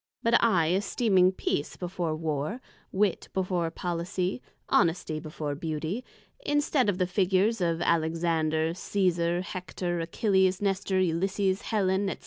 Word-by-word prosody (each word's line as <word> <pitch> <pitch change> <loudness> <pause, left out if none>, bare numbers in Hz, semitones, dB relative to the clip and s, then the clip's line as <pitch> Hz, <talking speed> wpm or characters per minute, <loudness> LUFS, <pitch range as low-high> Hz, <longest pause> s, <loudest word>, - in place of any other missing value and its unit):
But 230 +1 +4
I 175 -9 +3
esteeming 190 -1 +3
Peace 145 -5 -2
before 175 -3 -3
Warr, 155 - -2 0.3
Wit 195 -1 0
before 180 -3 0
Policy, 180 +5 -3 0.3
Honesty 165 -4 +1
before 155 -1 -5
Beauty; 160 - -3 0.4
instead 290 - +2
of 190 - 0
the 185 - +2
figures 190 +3 +1
of 170 -1 0
Alexander, 160 -1 +1
Cesar, 175 -2 0
Hector, 180 -1 -4
Achilles, 190 +2 +2
Nestor, 195 -1 0
Ulysses, 190 +2 +1
Hellen, 195 -2 0
&c. - - -3
180 Hz, 120 wpm, -28 LUFS, 165-195 Hz, 0.4 s, But